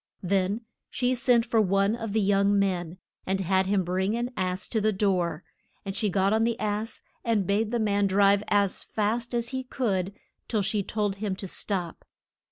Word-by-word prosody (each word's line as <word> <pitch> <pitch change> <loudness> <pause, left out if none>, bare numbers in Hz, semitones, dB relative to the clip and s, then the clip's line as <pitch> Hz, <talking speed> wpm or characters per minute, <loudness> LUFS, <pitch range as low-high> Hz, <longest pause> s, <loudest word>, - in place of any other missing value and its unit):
Then 195 +3 +1 0.3
she 250 0 0
sent 240 -1 +3
for 230 -2 +2
one 195 +2 +2
of 225 -3 -5
the 220 +1 +1
young 200 0 +3
men, 180 -3 0 0.3
and 190 +1 0
had 190 0 +1
him 195 -1 +2
bring 190 +4 0
an 240 +1 -2
ass 185 -1 -1
to 220 - 0
the 215 +1 +3
door, 180 -5 0 0.4
and 195 0 -4
she 210 -1 0
got 195 +2 +2
on 220 +1 +3
the 230 0 0
ass, 215 +1 -3 0.2
and 220 -4 +1
bade 210 +3 +1
the 240 - 0
man 205 -2 +2
drive 200 +1 +4
as 200 -2 +1
fast 230 +3 -2
as 235 0 0
he 260 0 -3
could 200 -7 -1 0.3
till 215 -4 0
she 205 +1 0
told 205 0 -1
him 200 -2 -2
to 195 0 -6
stop. 180 -3 -3
200 Hz, 190 wpm, -27 LUFS, 190-225 Hz, 0.4 s, drive